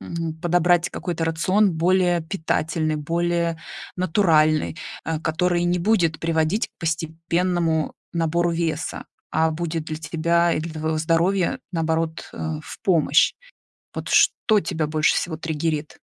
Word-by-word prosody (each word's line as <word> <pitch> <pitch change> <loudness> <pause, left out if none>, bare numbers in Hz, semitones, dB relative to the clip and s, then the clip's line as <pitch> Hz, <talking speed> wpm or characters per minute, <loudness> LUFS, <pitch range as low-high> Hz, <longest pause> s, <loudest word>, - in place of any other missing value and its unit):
м, 165 -1 -4
подобрать 175 0 +2
какой-то 170 -2 -3
рацион, 185 +5 +2
более 175 0 +3
питательный, 160 -2 -1
более 170 +1 -1 0.4
натуральный, 160 -4 +2 0.3
э, 160 -1 -2
который 175 +2 +1
не 175 +1 +1
будет 175 -4 +2
приводить 165 +6 0
к - - -44
постепенному 165 0 -1 0.2
набору 170 +1 +1
веса, 165 -2 -2 0.3
а 160 0 +2
будет 165 0 -3
для 155 -1 -4
тебя 170 +1 +1
и - - -1
для 165 +1 -5
твоего 155 0 -2
здоровья, 175 +8 +1
наоборот, 160 -1 -1
э, - - -12 0.3
в - - -10
помощь. 160 -6 +3 0.6
Вот - - -5
что 215 -2 +4
тебя 160 -3 -2
больше 155 0 +2
всего 160 -3 -2
триггерит? 155 -1 -3
165 Hz, 130 wpm, -23 LUFS, 160-175 Hz, 0.6 s, что